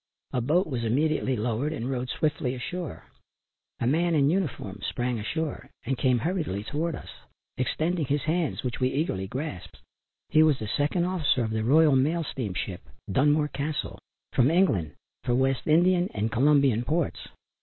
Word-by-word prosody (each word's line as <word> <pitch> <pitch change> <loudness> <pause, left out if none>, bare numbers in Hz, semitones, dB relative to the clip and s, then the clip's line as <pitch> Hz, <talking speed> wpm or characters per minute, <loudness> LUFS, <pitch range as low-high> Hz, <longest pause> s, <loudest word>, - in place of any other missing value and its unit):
A 125 - +1
boat 160 +10 +2
was 125 -6 -3
immediately 135 +3 +1
lowered 120 +6 -1
and 125 -5 -4
rowed 130 -1 -2
swiftly 140 -4 -1
ashore. 170 +6 -5 0.7
A - - -1
man 165 +6 +2
in 140 0 +4
uniform 130 - -2
sprang 120 +4 -2
ashore 160 +8 -3 0.2
and 135 +3 0
came 130 -1 +2
hurriedly 155 - -2
to 150 +3 -1
us, 165 -6 -4 0.5
extending 155 +6 0
both - - -14
his 145 -1 +1
hands 160 0 -1
which 125 -2 -3
we 130 -1 +2
eagerly 130 - -1
grasped. 115 - -6 0.5
He 155 - +5
was 155 -3 +4
the 110 - -5
second 145 - 0
officer 165 -9 +1
of 110 - -2
the 110 0 -1
Royal 150 +4 +5
Mail 155 +6 +2
steamship 100 - -4 0.3
Dunmore 150 +6 +3
Castle, 145 +2 -3 0.3
from 125 +1 +4
England 110 - +2 0.3
for 120 - +1
West 130 0 +1
Indian 175 +3 +4
and 110 +2 -1
Colombian 135 -1 +3
ports. 155 +4 -1
140 Hz, 165 wpm, -27 LUFS, 120-155 Hz, 0.7 s, He